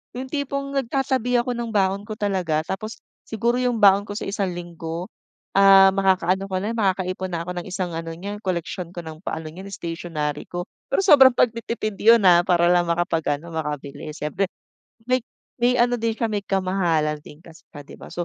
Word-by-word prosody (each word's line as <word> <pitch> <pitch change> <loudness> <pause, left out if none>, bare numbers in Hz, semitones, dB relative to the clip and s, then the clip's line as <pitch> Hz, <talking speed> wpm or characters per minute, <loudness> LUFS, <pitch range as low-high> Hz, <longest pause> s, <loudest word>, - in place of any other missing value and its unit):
Yung 260 +1 -5
tipong 280 -1 -3
nagtatabi 260 -2 0
ako 245 0 -2
ng 235 -1 -4
baon 195 0 +1
ko - - -8
talaga 185 -6 0
tapos 215 +4 -5 0.3
siguro 235 +2 0
yung 245 -3 0
baon 200 0 +7
ko 205 - -9
sa - - -5
isang 195 -2 -1
linggo, 170 0 -6 0.5
ah, 195 -1 +8
makakaano 190 -1 +2
ko 185 - 0
na 215 +4 -3
makakaipon 185 -3 -1
na 170 - -2
ako - - -3
ng 175 - -5
isang 180 -3 -3
ano 165 0 -5
niya 200 +5 -6
koleksyon 175 -1 -3
ko 175 - -7
ng 160 +1 -9
paano 160 0 -4
niyan 190 +5 -9
stationary 165 -4 -4
ko. 175 +1 -6 0.2
Pero - - +2
sobrang 285 -9 +7
pagtitipid 230 -3 -1
'yon, 225 -1 +5
ah, 175 0 +6
para 175 -1 +3
lang 175 0 +4
makapag-ano 170 -2 -1
makabili. 150 -1 -5
Siyempre 155 +6 -3 0.6
may 255 -1 +1 0.3
may 245 0 +2
ano 245 0 +3
din 230 -1 -1
siya, 230 - +1
may 205 -2 -3
kamahalan 180 -6 0
din 150 - -13
kasi, 165 0 -16
'di 145 -2 -11
ba? - - -12
190 Hz, 180 wpm, -23 LUFS, 170-225 Hz, 0.6 s, ah